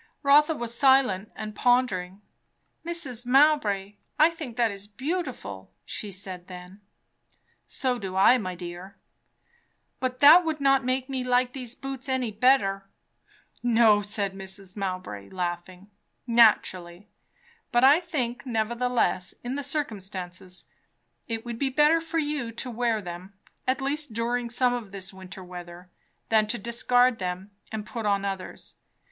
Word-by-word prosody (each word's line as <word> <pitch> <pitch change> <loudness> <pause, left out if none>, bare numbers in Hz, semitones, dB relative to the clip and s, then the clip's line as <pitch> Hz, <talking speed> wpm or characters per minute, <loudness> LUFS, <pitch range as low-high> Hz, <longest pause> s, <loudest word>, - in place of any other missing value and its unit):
Rotha 295 +3 +5
was 235 -3 -4
silent 255 -7 +3
and 215 -1 -6
pondered. 220 -6 +1 0.7
"Mrs. 285 -9 -1
Mowbray, 235 -8 +3 0.2
I 315 +2 +6
think 295 -8 -8
that 235 -2 +2
is 200 0 -9
beautiful," 255 - -5 0.2
she 210 - -5
said 185 -1 -7
then. 180 +2 -11 0.9
"So 255 -3 -1
do 190 -3 -6
I, 220 +7 +6
my 185 -4 -4
dear." 175 +2 -8 1.0
"But 255 -1 -2
that 305 +6 +8
would 315 -2 -2
not 275 -1 +3
make 255 +1 -1
me 265 -2 -3
like 250 0 +1
these 250 -3 -6
boots 270 0 -6
any 255 -3 0
better." 205 -4 +2 0.7
"No," 225 -3 +4
said 200 -1 0
Mrs. 190 0 -8
Mowbray 185 - -5
laughing. 180 +2 -5 0.3
"Naturally. 205 -6 +3 0.6
But 240 -1 +3
I 280 +5 +7
think 265 -9 -3
nevertheless, 235 -4 0
in 245 +1 -3
the 285 - -2
circumstances, 190 - -5 0.6
it 225 0 -4
would 235 -1 -6
be 275 - +1
better 300 +4 +4
for 330 0 -4
you 295 -6 -2
to 245 +2 -5
wear 230 -2 0
them, 180 +2 -8 0.3
at 260 +1 +1
least 285 -2 -2
during 235 +1 -1
some 245 +1 +2
of 230 -5 -5
this 195 -1 -4
winter 190 0 -10
weather, 180 0 -10 0.4
than 220 -1 +3
to 235 +3 -1
discard 245 +2 +2
them 185 +2 -4 0.2
and 215 -1 -4
put 225 -1 -4
on 200 -1 +1
others. 195 -2 -6
230 Hz, 140 wpm, -26 LUFS, 195-260 Hz, 1.0 s, that